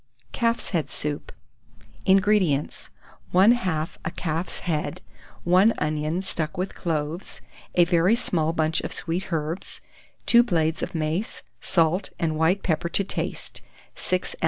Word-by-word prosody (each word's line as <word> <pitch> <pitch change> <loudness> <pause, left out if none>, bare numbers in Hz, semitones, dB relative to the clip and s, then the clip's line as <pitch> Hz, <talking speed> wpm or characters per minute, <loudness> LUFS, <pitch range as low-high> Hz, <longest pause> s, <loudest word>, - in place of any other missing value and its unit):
CALF'S 230 0 0
HEAD 170 -5 0
SOUP. 145 -1 -4 0.8
167. 190 0 +7
INGREDIENTS. 190 -8 +1 0.5
1/2 185 -6 +3
a - - -1
calf's 165 +1 -3
head, 155 -4 -2 0.4
1 185 +6 +5
onion 155 +4 -1
stuck 165 -2 -2
with 185 +2 -2
cloves, 160 +1 -3 0.3
a 175 - +6
very 175 +5 +4
small 165 -9 0
bunch 160 -1 +1
of - - -5
sweet 175 +3 -3
herbs, 160 +2 -3 0.5
2 235 - +7
blades 165 -9 0
of 180 - -4
mace, 160 +6 -2 0.2
salt 170 +2 +1
and 160 -2 0
white 165 +5 +2
pepper 170 0 0
to 200 - +2
taste, 195 - -4 0.3
6 185 0 -2
oz. - - -15
170 Hz, 135 wpm, -25 LUFS, 155-190 Hz, 0.8 s, 167